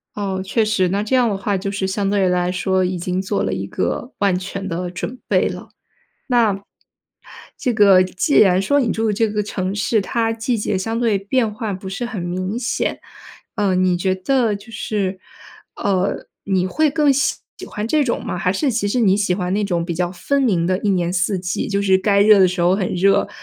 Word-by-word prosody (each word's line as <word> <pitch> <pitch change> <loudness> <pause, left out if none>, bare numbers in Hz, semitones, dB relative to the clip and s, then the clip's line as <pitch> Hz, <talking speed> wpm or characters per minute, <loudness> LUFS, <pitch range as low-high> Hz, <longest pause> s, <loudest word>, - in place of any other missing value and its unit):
哦， 195 -2 -2
确 215 +3 +1
实， 200 -4 +1
那 200 +3 0
这 215 +5 0
样 245 -2 +3
的 200 - -2
话 200 0 -1
就 195 +2 -4
是 195 -1 -2
相 195 +1 -1
对 200 -2 +2
来 180 0 +1
说 185 0 0
已 185 0 -1
经 180 +2 -2
做 200 +1 -1
了 - - -1
一 95 +1 -4
个 95 - -3
万 195 -3 +2
全 195 +1 -5
的 175 0 -3
准 235 +7 -6
备 - - +2
了。 - - -8 0.6
那 230 -6 +2 1.0
这 250 - 0
个 200 -3 +6
既 185 +9 +1
然 185 -2 +5
说 285 +9 +2
你 240 -4 0
住 220 -1 0
这 225 +2 +1
个 210 0 -1
城 190 -2 -3
市， 210 +2 +1
它 225 +3 -1
季 225 +2 -1
节 205 -2 -1
相 225 +4 -2
对 230 -4 +1
变 215 +3 0
化 215 0 -4
不 190 0 -7
是 195 +6 -4
很 220 -7 -5
明 185 +5 -3
显， 245 0 -2 0.6
呃， 200 -3 +1
你 185 -1 +2
觉 185 +1 0
得 225 +3 +1
就 215 +3 -14
是， 195 -3 -3 0.6
呃， 190 -1 -1 0.2
你 190 -2 +1
会 310 +10 +1
更 295 -1 +3
喜 270 0 +1 0.2
喜 - - -8
欢 210 +1 -4
这 300 +5 +2
种 250 -4 -2
吗？ - - -3
还 180 +1 +1
是 270 +8 0
其 215 -3 -1
实 245 +5 0
你 195 -4 +4
喜 200 -3 +1
欢 180 -1 -2
那 210 - 0
种 175 -4 -1
比 170 0 -3
较 175 +1 -1
分 275 +10 -1
明 185 -10 +1
的 185 +1 +1
一 205 - 0
年 175 -2 0
四 185 +2 0
季， 180 0 -3
就 200 -1 0
是 190 -1 +4
该 200 +1 +2
热 210 0 +6
的 190 -1 +6
时 180 0 -3
候 175 +2 +3
很 195 -2 -1
热， 195 +2 +3
195 Hz, 240 characters per minute, -20 LUFS, 185-220 Hz, 1.0 s, 个